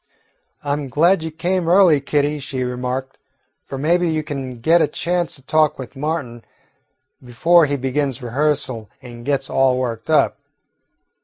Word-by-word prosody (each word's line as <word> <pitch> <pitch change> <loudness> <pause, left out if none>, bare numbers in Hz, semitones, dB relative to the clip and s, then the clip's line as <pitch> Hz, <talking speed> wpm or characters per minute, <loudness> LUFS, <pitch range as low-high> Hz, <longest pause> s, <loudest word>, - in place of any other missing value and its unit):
"I 145 -1 -1
'm 145 -1 -3
glad 170 +7 +3
you 160 - -4
came 170 +2 -1
early, 175 -5 +5
Kitty," 145 +1 0
she 130 -1 -4
remarked, 125 +2 -4 0.4
"for 135 - -8
maybe 170 +5 +1
you 155 -1 -1
can 135 -4 -5
get 160 +9 +3
a - - +3
chance 175 +1 -2
to 135 - -9
talk 155 +2 +2
with 130 +1 -9
Martin 135 -5 -4 0.8
before 165 +7 +3
he 145 - -1
begins 135 0 -1
rehearsal 130 -3 -1
and 120 -1 -10
gets 135 0 -1
all 130 -1 +2
worked 120 -3 -4
up. - - +2
140 Hz, 155 wpm, -20 LUFS, 130-160 Hz, 0.8 s, early